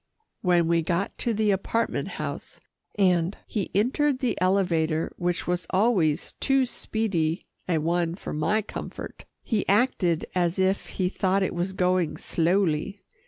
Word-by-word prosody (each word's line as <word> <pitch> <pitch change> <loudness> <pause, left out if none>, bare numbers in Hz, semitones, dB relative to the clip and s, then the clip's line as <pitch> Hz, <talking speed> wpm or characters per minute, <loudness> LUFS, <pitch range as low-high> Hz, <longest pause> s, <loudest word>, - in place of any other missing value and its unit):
When 175 -3 +3
we 170 0 +3
got 170 +4 -1
to 235 - 0
the 215 -1 +2
apartment 225 +4 -1
house, - - -6 0.4
and 180 -2 +2
he 205 -4 -3
entered 260 +6 +2
the 255 -4 0
elevator 170 -4 +1
which 175 0 -1
was 175 -1 -2
always 185 -7 +2
too 270 -1 +3
speedy 195 -9 -1 0.2
a 170 - +3
one 170 +2 0
for - - -6
my 210 +8 +1
comfort, - - -8 0.2
he 220 -4 0
acted 195 -6 +2
as 175 -1 +1
if 190 +1 +1
he 185 - +2
thought 190 +1 +1
it - - -1
was 175 +2 -2
going 180 -3 +1
slowly. 180 +2 0
185 Hz, 145 wpm, -26 LUFS, 170-205 Hz, 0.4 s, When